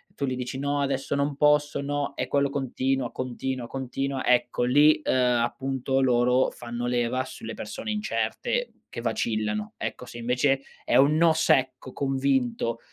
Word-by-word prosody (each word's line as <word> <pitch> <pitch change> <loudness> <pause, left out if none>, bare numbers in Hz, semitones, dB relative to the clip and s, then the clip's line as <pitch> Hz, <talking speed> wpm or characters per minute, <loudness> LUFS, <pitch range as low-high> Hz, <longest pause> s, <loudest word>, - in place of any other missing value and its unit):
tu 140 - -1
li 130 -1 -2
dici: 125 +1 -4
"No, 145 0 0
adesso 135 0 -1
non 140 0 0
posso, 150 0 +3
no." 140 0 -2
E, - - -2
quello 140 -1 +1
continuo, 135 -2 -1
contina, 130 -1 -4
continua. 135 +1 -3
Ecco, 125 0 +2
lì, 145 +5 +5
uhm, - - +1 0.3
appunto, 135 +2 -1
loro 125 0 +3
fanno 120 0 -5
leva 125 +1 0
sulle 110 0 -8
persone 110 - -5
incerte 215 - -2 0.2
che 115 - -6
vacillano. 110 -2 -1
Ecco, - - -5
se 120 - -10
invece 125 +3 +1 0.2
è - - 0
un 145 +3 +5
no 165 -1 +5
secco, 130 -4 +1
convinto, 130 -4 0
130 Hz, 155 wpm, -26 LUFS, 120-140 Hz, 0.3 s, lì